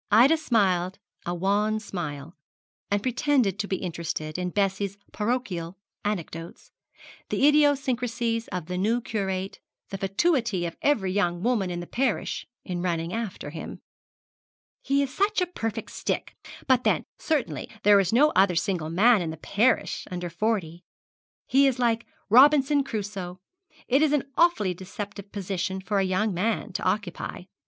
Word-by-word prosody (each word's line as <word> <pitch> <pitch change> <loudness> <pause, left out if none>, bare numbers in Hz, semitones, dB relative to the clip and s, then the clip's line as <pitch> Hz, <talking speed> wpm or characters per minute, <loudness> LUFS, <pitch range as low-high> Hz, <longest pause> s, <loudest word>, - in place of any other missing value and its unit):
Ida 240 +9 +6
smiled 190 - +1 0.3
a 175 - -1
wan 205 +4 +1
smile, 165 -7 -6 0.6
and 205 0 0
pretended 250 - +1
to 205 - -1
be 195 - 0
interested 165 -3 -4
in 180 0 -1
Bessie's 195 0 -1
parochial 210 -6 -2 0.3
anecdotes 170 -5 -5 0.6
the 280 - +3
idiosyncrasies 250 -6 +2
of 180 -4 -4
the 180 +2 -3
new 225 +5 +2
curate, 195 -4 -3 0.3
the 195 - -5
fatuity 210 - +1
of 170 - -4
every 215 -11 +2
young 175 -3 0
woman 230 -6 +1
in 175 -1 -3
the - - -6
parish 240 +2 -1 0.2
in 180 -2 -3
running 170 -1 -1
after 220 -10 -4
him. 160 - -8 1.0
'He 280 +1 +2
is 265 - -5
such 410 +2 +1
a 360 - +2
perfect 225 - -4
stick; - - -3 0.3
but 255 -2 +3
then - - +2 0.2
certainly 310 -5 -1
there 205 0 +7
is 190 -2 +1
no 290 +7 +5
other 190 -1 +4
single 170 -3 -1
man 210 +5 +5
in 165 - -2
the 160 - -6
parish 225 +9 +1
under 175 -1 -4
forty. 175 -3 -1 0.6
He 275 +1 +4
is 265 -2 +1
like 235 -2 +1 0.2
Robinson 280 +4 +6
Crusoe. 195 -6 -5 0.5
It 270 +3 +3
is 305 -1 +3
an 295 - +2
awfully 260 - +3
deceptive 200 +2 -8
position 190 -1 -3
for 200 +1 -1
a - - +2
young 190 +3 0
man 205 +3 -1
to - - -3
occupy. 185 -2 -2
205 Hz, 150 wpm, -26 LUFS, 180-245 Hz, 1.0 s, there